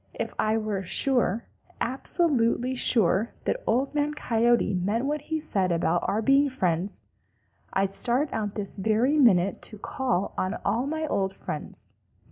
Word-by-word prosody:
If - - -4
I 215 +1 +2
were 215 -3 -2
sure, 235 +2 +2 0.3
absolutely 255 -2 0
sure, 220 -4 +3
that - - -1
Old 265 +5 +1
Man 295 0 0
Coyote 235 -5 +2
meant 205 +7 0
what 295 +1 -1
he 315 0 0
said 190 - -1
about 170 0 +1
our 220 +2 0
being 275 +3 +4
friends, 185 -5 -2 0.7
I'd 195 0 +1
start 250 +8 0
out 210 -2 -3
this 205 -1 -5
very 225 +9 +2
minute 195 -7 +4
to 215 - -10
call 220 -3 -2
on 185 +3 -1
all 245 +4 0
my 315 +1 -2
old 195 -9 -1
friends. - - -7
225 Hz, 150 wpm, -26 LUFS, 195-270 Hz, 0.7 s, being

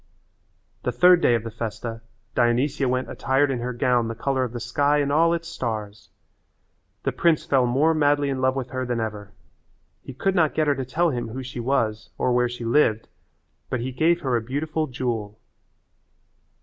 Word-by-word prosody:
The - - -1
third 180 -1 +5
day 120 - +4
of 115 - -2
the 115 - -6
festa 115 +1 -5 0.3
Dionysia 130 +3 +1
went 130 +1 -1
attired 135 +1 +1
in 125 - -2
her 125 +1 -3
gown 120 -1 +1
the 115 - -4
colour 130 +3 0
of 125 - -3
the 120 - -5
sky 145 +5 +1
and 140 -1 0
all 165 +3 +4
its 170 0 -2
stars. 110 -9 -5 0.9
The - - 0
prince 165 -3 +2
fell 130 -3 +2
more 145 +7 +3
madly 145 -2 +2
in 130 -1 -3
love 130 0 +2
with 130 -2 -4
her 130 -1 -2
than 120 -2 -2
ever. 105 -2 -4 0.7
He 135 - -10
could 195 +8 0
not 160 -5 +2
get 155 - +2
her 145 - +3
to 135 -1 -4
tell 165 +6 +1
him 120 -3 -3
who 130 +4 -6
she 130 -1 -7
was 110 -4 -1
or 125 - +1
where 125 0 +2
she 120 -1 -6
lived 115 -3 +2 0.6
but 130 - -1
he 125 +3 -3
gave 165 +6 +2
her 130 -3 0
a 115 - +1
beautiful 155 +6 -2
jewel. 115 -5 -3
130 Hz, 195 wpm, -24 LUFS, 120-145 Hz, 0.9 s, third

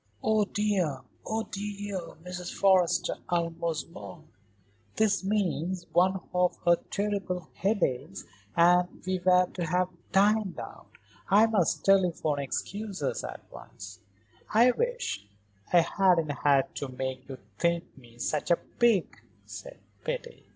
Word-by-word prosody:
"Oh, 215 -1 +3
dear! 195 -10 0 0.3
Oh, 220 0 -1
dear!" 205 -1 -5 0.3
Mrs. 180 -1 -5
Forrester 190 -3 +3
almost 170 -2 -1
moaned. 100 - -11 0.7
"This 205 -3 +2
means 185 -3 -1
one 185 +2 +3
of 180 0 +2
her 170 0 +6
terrible 195 -4 -2
headaches 190 - -1 0.3
and 180 +1 +4
we 185 0 0
were 180 0 +5
to 180 - -3
have 180 +2 +1 0.2
dined 205 0 +3
out. - - -9 0.4
I 205 +3 +6
must 180 -8 +1
telephone 175 -6 +3
excuses 190 +3 -3
at - - -7
once." 100 +2 -11 0.5
"I 235 +4 +6
wish 485 - -2 0.4
I 175 - +7
hadn't 175 -3 +2
had 140 0 +2
to 140 - -4
make 130 +1 -5
you 135 - -6 0.2
think 170 0 0
me 120 -3 -17
such 150 +5 -2
a 170 - +6
pig," 225 -1 +1 0.3
said - - -9 0.3
Betty. - - -5
180 Hz, 125 wpm, -28 LUFS, 165-205 Hz, 0.7 s, I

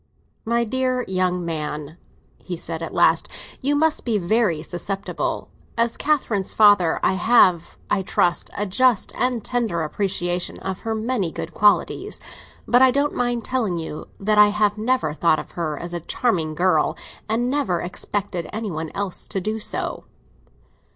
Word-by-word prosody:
"My 235 +1 +2
dear 255 +2 0
young 185 -1 0
man," 150 -1 -4 0.4
he 180 -2 -6
said 165 0 -5
at 165 - -4
last, - - +3 0.3
"you 285 +2 +2
must 315 +1 +1
be 230 -4 +1
very 185 -4 +1
susceptible. 195 +4 -3 0.3
As 230 0 +1
Catherine's 240 -10 0
father, 205 -6 +5
I - - +3
have, 185 -4 +3
I 205 - +1
trust, 175 -1 +1
a 205 - +1
just 235 +3 +2
and 250 -3 -1
tender 225 -10 -1
appreciation 175 +1 -2
of 190 0 -4
her 225 -1 -3
many 220 -6 -1
good 165 - -6
qualities; 210 0 +2 0.5
but 245 +1 +5
I 260 - +8
don't 280 +3 +1
mind 240 -1 -1
telling 225 -9 0
you 160 -2 -6
that 210 +1 +2
I 210 - +9
have 210 0 +1
never 220 -7 0
thought 155 0 +3
of - - -7
her 155 -4 -3
as 175 0 -6
a 175 - -2
charming 170 -3 -1
girl, 180 +3 +2 0.3
and 235 +3 +1
never 255 -10 0
expected 185 -1 -4
any 215 -2 -4
one 160 0 -4
else 200 -2 -3
to 195 - -2
do 215 +4 -3
so." - - -3
205 Hz, 160 wpm, -22 LUFS, 175-235 Hz, 0.5 s, I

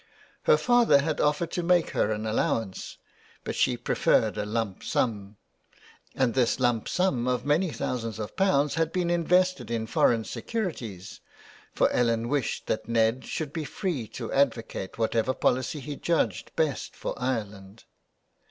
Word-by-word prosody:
Her 475 -1 +6
father 240 -12 +4
had 155 0 -1
offered 150 +3 +1
to 175 - -1
make 175 0 +2
her - - +1
an 110 0 -2
allowance, 110 -2 -2 0.5
but - - -3
she - - +2
preferred 110 -2 +2
a 105 -1 -3
lumpsum, 105 -1 -2 0.8
and 130 -3 +1
this 125 0 +2
lump 120 -3 +1
sum 160 -10 +1
of 125 0 0
many 160 +6 +2
thousands 115 -4 -3
of 105 -1 -6
pounds 150 -7 +2
had 165 -1 0
been 180 -2 0
invested 180 0 +2
in 115 -1 -1
foreign 115 +1 +2
securities, 120 - -5 0.6
for - - +4
Ellen 115 -1 +1
wished 140 -4 -1
that 110 +1 -3
Ned 115 +2 +2
should 150 -3 -4
be 160 - -3
free 150 - -3
to 115 0 -6
advocate 115 -8 0
whatever 115 +2 +1
policy 130 +4 0
he 145 +2 -6
judged 115 - -1
best 155 -4 -1
for - - -4
Ireland. 105 -5 -4
125 Hz, 150 wpm, -27 LUFS, 110-160 Hz, 0.8 s, Her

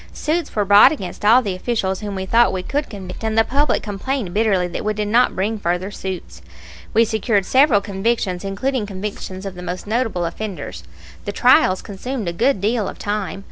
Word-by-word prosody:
Suits 320 +1 -2
were 210 -2 +1
brought 205 +1 +8
against 200 - -6
all 235 +5 +6
the 200 -4 -2
officials 190 -1 -2
whom 205 -2 -5
we 190 0 -3
thought 235 +5 +4
we 185 - -3
could 290 +8 -2
convict; 200 0 -8
and 220 0 -1
the 225 - +6
public 285 +5 +1
complained 210 -1 -3
bitterly 200 -4 +2
that 175 - -5
we 215 0 -1
did 210 0 -2
not 240 +4 +3
bring 210 +3 -1
further 180 +1 -1
suits. 190 -3 -6 0.5
We 230 +1 +4
secured 220 -2 0
several 260 -4 +4
convictions, 200 -2 -1
including 210 +4 -2
convictions 195 -1 -6
of 195 - -5
the 180 - -9
most 180 0 -5
notable 220 -5 -1
offenders. 175 - -6 0.4
The 205 - -2
trials 200 -5 +4
consumed 220 +2 -5
a 170 - -2
good 235 +5 +1
deal 215 +1 0
of - - -9
time. 205 -1 -3
205 Hz, 195 wpm, -20 LUFS, 190-230 Hz, 0.5 s, brought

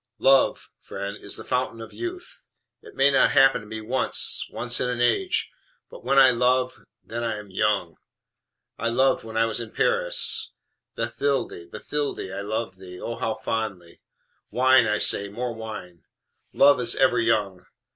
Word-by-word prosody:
"LOVE, 135 0 +2
friend, 100 +1 -6
is - - -1
the - - -7
fountain 125 -2 -2
of 115 - -10
youth! 360 +7 -8 0.3
It - - -15
may 135 +1 +4
not 135 - +3
happen 135 -3 +5
to 105 - -14
me 110 +1 -7
once 125 +5 +2
once 120 +1 -2
in 125 - 0
an 125 -1 -3
age: 370 - +1 0.4
but - - -12
when 140 - +1
I 135 -1 +7
love 125 +1 0 0.2
then 120 +1 -5
I 115 -2 -2
am 105 -2 -11
young. 95 -4 -1 0.8
I 115 - -1
loved 130 +3 +1
when 110 0 -7
I 115 - +3
was 115 0 -2
in 115 -2 -6
Paris. - - +2 0.4
Bathilde, 135 -11 -3
Bathilde, 145 -8 -4
I 100 - -5
loved 105 -2 -4
thee 90 -1 -11
ah, 115 - -5
how 110 -1 -2
fondly! 100 -7 -5 0.5
Wine, 130 -1 +4
I 105 0 +1
say, 100 -1 +1
more 120 +4 -4
wine! 105 -6 -9 0.5
Love 140 -1 +5
is 120 -1 +3
ever 180 0 +3
young. 105 -5 0
115 Hz, 165 wpm, -24 LUFS, 105-135 Hz, 0.8 s, I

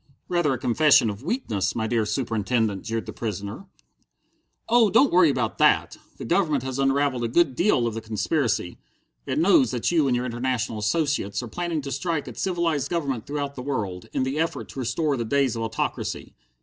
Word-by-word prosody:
"Rather 175 -5 +2
a - - -2
confession 125 -1 +4
of 100 +2 -9
weakness, 110 - -2
my 110 - -1
dear 110 -1 0
Superintendent," 110 -2 -1
jeered 115 -1 -3
the - - -7
prisoner. 105 - -5 1.0
"Oh 235 -3 +5
don't 230 +8 +4
worry 175 -3 +6
about 125 -5 -1
that! - - +3 0.2
The - - -7
Government 155 -3 +1
has 130 0 -4
unravelled 135 -2 +1
a - - +1
good 140 +2 +2
deal 170 - +2
of 115 - -1
the 115 - -5
conspiracy. 110 - -1 0.5
It - - -1
knows 160 - +4
that 125 +4 -1
you 160 -5 +3
and 125 - +2
your 125 +1 -1
international 120 -2 -2
associates 105 -3 0
are - - -6
planning 170 +4 -3
to 140 - -5
strike 145 +2 -2
at - - -8
civilized 170 -6 0
government 140 -9 -2
throughout 140 0 -3
the 130 - -7
world, 105 -10 -4
in - - 0
the 135 +3 -2
effort 165 +1 -2
to - - -8
restore 135 +4 0
the 120 - -1
days 130 +1 +1
of 115 - -3
autocracy. 115 0 -3
130 Hz, 190 wpm, -24 LUFS, 115-155 Hz, 1.0 s, worry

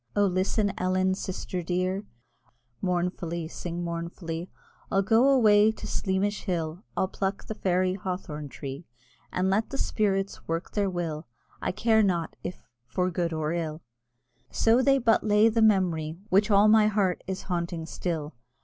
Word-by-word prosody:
O 205 0 +4
listen, 195 +2 +1
Ellen, 185 +1 +2
sister 185 -1 -4
dear, 185 +3 -1 0.7
(Mournfully, 175 -2 -1
sing 175 +1 -5
mournfully) 170 0 -5 0.4
I'll 195 0 +3
go 230 +6 +4
away 215 -5 +6
to - - -9
Sleamish 200 +1 -1
hill, 170 -2 -2 0.2
I'll 190 - +2
pluck 195 +1 -3
the - - -4
fairy 185 -2 +1
hawthorn 180 -6 -5
tree, 140 +4 -7 0.4
And 185 +1 +1
let 215 +3 +1
the 275 - -4
spirits 195 -5 -1
work 165 +2 -3
their 200 -2 0
will; 165 -3 -4 0.3
I - - 0
care 220 +3 +3
not 175 -5 0
if 180 - -6 0.2
for 180 +5 0
good 170 -1 -1
or 155 0 -1
ill, 160 -2 -3 0.7
So 230 +3 +3
they 275 +1 +4
but 230 -4 +3
lay 210 +1 +5
the 225 0 +1
memory 175 -7 +2
Which 200 +4 +3
all 205 0 +6
my 215 0 +6
heart 200 -4 +1
is 190 0 -4
haunting 170 -2 -3
still! 160 -3 -4
185 Hz, 155 wpm, -27 LUFS, 170-205 Hz, 0.7 s, away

